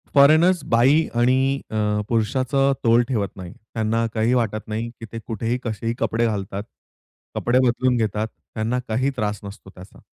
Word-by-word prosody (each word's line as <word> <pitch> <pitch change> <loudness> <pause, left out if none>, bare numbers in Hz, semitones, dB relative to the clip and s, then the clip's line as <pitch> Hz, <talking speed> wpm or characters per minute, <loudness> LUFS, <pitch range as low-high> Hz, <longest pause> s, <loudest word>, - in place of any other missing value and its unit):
Foreigners 160 +6 +5
बाई 135 +7 +4
आणि 125 +2 +3 0.3
अ, - - -4 0.3
पुरुषाचा 130 +4 +1
तोल 115 +1 +5
ठेवत 105 -6 -1
नाही. 90 -1 -8 0.2
त्यांना 115 0 0
काही 115 +2 +1
वाटत 110 -3 -1
नाही, 110 +2 -3
की 115 - -7
ते 115 - -5
कुठेही 115 +2 -2
कसेही 115 0 -2
कपडे 115 +1 +1
घालतात, 100 -2 -3 0.7
कपडे 120 +1 +2
बदलून 125 +1 +1
घेतात, 110 -1 -1
त्यांना 110 +2 -4
काही 125 +5 +1
त्रास 105 -1 -1
नसतो 100 -1 -10
त्याचा. 90 +2 -14
115 Hz, 155 wpm, -22 LUFS, 110-125 Hz, 0.7 s, Foreigners